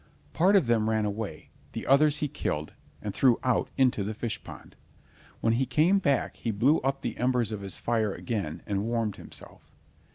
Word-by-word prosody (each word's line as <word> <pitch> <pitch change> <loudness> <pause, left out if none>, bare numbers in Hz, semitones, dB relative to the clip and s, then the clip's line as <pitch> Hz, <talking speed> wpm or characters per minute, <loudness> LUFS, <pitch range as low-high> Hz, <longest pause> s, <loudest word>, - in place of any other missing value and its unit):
Part 185 +5 +4
of 190 -8 +5
them 115 -2 +2
ran 110 -1 +1
away, 105 -6 -5 0.2
the - - -5
others 150 +2 +4
he - - -1
killed, 75 - -3 0.3
and 105 - -3
threw 120 +3 +4
out 125 -2 +1
into 130 -6 +3
the 105 +2 -4
fish 110 -1 -4
pond. - - -12 0.7
When 115 - +2
he 130 +3 +1
came 160 +9 +3
back 140 -9 0
he - - -3
blew 125 +9 +3
up 135 +1 -1
the - - -4
embers 125 -3 +1
of 105 -2 -4
his 95 -1 -3
fire 110 -3 0
again 95 -9 -4
and 100 -1 -1
warmed 115 -3 -1
himself. - - -11
115 Hz, 190 wpm, -28 LUFS, 105-135 Hz, 0.7 s, of